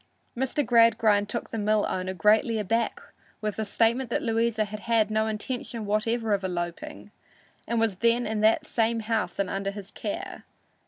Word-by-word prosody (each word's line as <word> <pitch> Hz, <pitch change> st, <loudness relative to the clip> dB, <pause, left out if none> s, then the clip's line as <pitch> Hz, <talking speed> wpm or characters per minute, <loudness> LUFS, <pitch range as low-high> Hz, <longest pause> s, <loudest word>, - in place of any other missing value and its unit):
Mr. 265 Hz, +3 st, 0 dB
Gradgrind 220 Hz, -3 st, +4 dB
took 235 Hz, -, -4 dB
the 225 Hz, -, -3 dB
mill 210 Hz, 0 st, +2 dB
owner 185 Hz, 0 st, -3 dB
greatly 215 Hz, +5 st, +3 dB
aback 225 Hz, +3 st, 0 dB, 0.4 s
with 210 Hz, -1 st, -3 dB
the 220 Hz, -, -1 dB
statement 230 Hz, +4 st, +1 dB
that -, -, -1 dB
Louisa 225 Hz, -1 st, +1 dB
had 210 Hz, +1 st, -7 dB
had 225 Hz, -1 st, +1 dB
no 220 Hz, 0 st, +1 dB
intention 230 Hz, +1 st, -4 dB
whatever 220 Hz, +2 st, 0 dB
of 200 Hz, -1 st, 0 dB
eloping 175 Hz, -2 st, -5 dB, 0.6 s
and 235 Hz, -, 0 dB
was 225 Hz, -4 st, +1 dB
then 235 Hz, +3 st, +2 dB
in 215 Hz, -1 st, -2 dB
that 220 Hz, +1 st, +3 dB
same 230 Hz, 0 st, 0 dB
house 215 Hz, -5 st, -1 dB
and 200 Hz, -, 0 dB
under 195 Hz, +1 st, -2 dB
his 200 Hz, 0 st, -8 dB
care. -, -, -5 dB
220 Hz, 170 wpm, -26 LUFS, 205-230 Hz, 0.6 s, Gradgrind